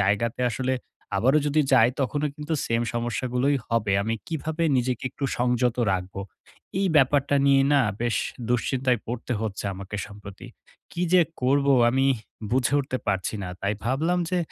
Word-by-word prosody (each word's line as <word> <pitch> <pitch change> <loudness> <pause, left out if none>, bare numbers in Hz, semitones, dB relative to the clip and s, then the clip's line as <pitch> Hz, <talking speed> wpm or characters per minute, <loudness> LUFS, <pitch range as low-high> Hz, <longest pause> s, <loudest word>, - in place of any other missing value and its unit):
জায়গাতে 105 +5 +1
আসলে 130 +3 -1 0.4
আবারও 130 +9 +4
যদি 150 +1 +2
যাই 115 -3 +6
তখনও 145 +3 0
কিন্তু 150 +2 -3
সেম 115 0 +1
সমস্যাগুলোই 125 +4 0
হবে। 115 -4 +1
আমি 110 +2 -1
কিভাবে 160 +1 -3
নিজেকে 125 -1 -1
একটু 140 - -6
সংযত 125 -1 +1 0.2
রাখবো? 95 +1 -3 0.6
এই 195 - +2
ব্যাপারটা 140 0 +3
নিয়ে 135 -1 +5
না 140 - +5 0.2
বেশ 120 -1 +1 0.3
দুশ্চিন্তায় 125 +1 +1
পড়তে 120 +2 -4
হচ্ছে 110 -3 -4
আমাকে 100 +2 -7
সম্প্রতি। 100 -1 -11 0.5
কি 175 - -3
যে 185 - +7 0.2
করব 140 +2 +2 0.2
আমি 135 +2 +2 0.4
বুঝে 125 +2 +1
উঠতে 130 -2 -3
পারছি 95 +1 -1
না? 90 - -4
তাই 100 +1 0
ভাবলাম 155 +9 +1
যে 180 - +1
125 Hz, 155 wpm, -25 LUFS, 115-140 Hz, 0.6 s, যে